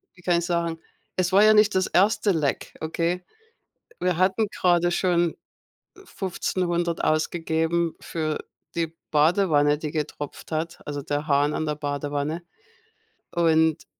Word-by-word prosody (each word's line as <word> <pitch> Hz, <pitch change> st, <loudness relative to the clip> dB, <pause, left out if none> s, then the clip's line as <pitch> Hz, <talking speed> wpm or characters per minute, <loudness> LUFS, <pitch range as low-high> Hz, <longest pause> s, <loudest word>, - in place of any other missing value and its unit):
wie 175 Hz, -, -18 dB
kann 175 Hz, -1 st, +2 dB
ich 170 Hz, -, -3 dB
sagen, 170 Hz, -2 st, -1 dB, 0.4 s
es 180 Hz, -1 st, 0 dB
war 195 Hz, +2 st, +6 dB
ja 215 Hz, 0 st, +7 dB
nicht 210 Hz, 0 st, +5 dB
das 185 Hz, 0 st, +2 dB
erste 210 Hz, +3 st, +3 dB
Leck, 155 Hz, -6 st, -1 dB
okay? 170 Hz, +3 st, -1 dB, 0.8 s
Wir 180 Hz, -1 st, +1 dB
hatten 190 Hz, +5 st, +2 dB
grade 175 Hz, -1 st, +3 dB
schon 175 Hz, -2 st, +1 dB, 0.7 s
1500 175 Hz, -, -2 dB
ausgegeben 165 Hz, +1 st, 0 dB
für 155 Hz, -2 st, -3 dB, 0.4 s
die 165 Hz, -1 st, 0 dB, 0.2 s
Badewanne, 150 Hz, -2 st, +3 dB
die 155 Hz, -1 st, -5 dB
getropft 150 Hz, -1 st, -5 dB
hat 165 Hz, +2 st, -3 dB
also 145 Hz, -1 st, -4 dB
der 145 Hz, +2 st, -3 dB
Hahn 145 Hz, +1 st, +2 dB
an 155 Hz, -, -1 dB
der 150 Hz, -1 st, -1 dB
Badewanne. 145 Hz, +2 st, -3 dB, 0.9 s
Und 160 Hz, -2 st, +2 dB
170 Hz, 135 wpm, -25 LUFS, 155-180 Hz, 0.9 s, ja